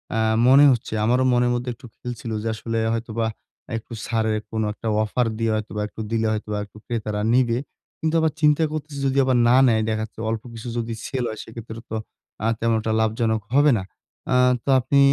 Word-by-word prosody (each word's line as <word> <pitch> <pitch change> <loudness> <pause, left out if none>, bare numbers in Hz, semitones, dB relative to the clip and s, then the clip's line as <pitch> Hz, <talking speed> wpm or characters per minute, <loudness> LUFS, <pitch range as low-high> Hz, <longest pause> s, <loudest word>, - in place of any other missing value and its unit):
আ - - +1 0.3
মনে 135 +2 +8
হচ্ছে 120 -2 -2
আমারও 125 +3 +3
মনের 120 0 +3
মধ্যে 120 +1 -3
একটু 120 +2 -15
খেলছিল 120 -2 -6
যে 115 - -3
আসলে 115 +1 -3 0.2
হয়তোবা 115 0 -2 0.5
একটু 115 +1 -9
ছাড়ের 110 -1 0 0.2
কোন 110 0 -1
একটা 115 - -7 0.2
অফার 120 +3 0
দিয়ে 115 -1 +1
হয়তোবা 105 -1 -3
একটু 110 - -8
দিলে 115 -1 +1
হয়তোবা 105 -1 -3
একটু 105 - -18
ক্রেতারা 105 -3 -2
নিবে। 120 -2 +3 0.4
কিন্তু 160 +1 0
আবার 160 -1 +2
চিন্তা 150 +1 +4
করতেছি 155 -2 -5
যদি 135 0 +1
আবার 130 -1 +2
না 120 - +5
নেয় 110 -2 +3
দেখা 110 0 -1
যাচ্ছে 110 - -10
অল্প 110 -1 -2
কিছু 115 +1 -8
যদি 115 0 -2
সেল 130 -3 -2
হয়, 110 - -6
সেক্ষেত্রে 115 0 -9
তো - - -2 0.5
আ - - +3
তেমন 115 0 +2
একটা 110 0 -1
লাভজনক 110 0 +1
হবে 145 +1 +6
না। 95 - -3 0.5
আ - - +4 0.3
তো - - -4
আপনি 140 +3 +2
115 Hz, 200 wpm, -23 LUFS, 110-125 Hz, 0.5 s, মনে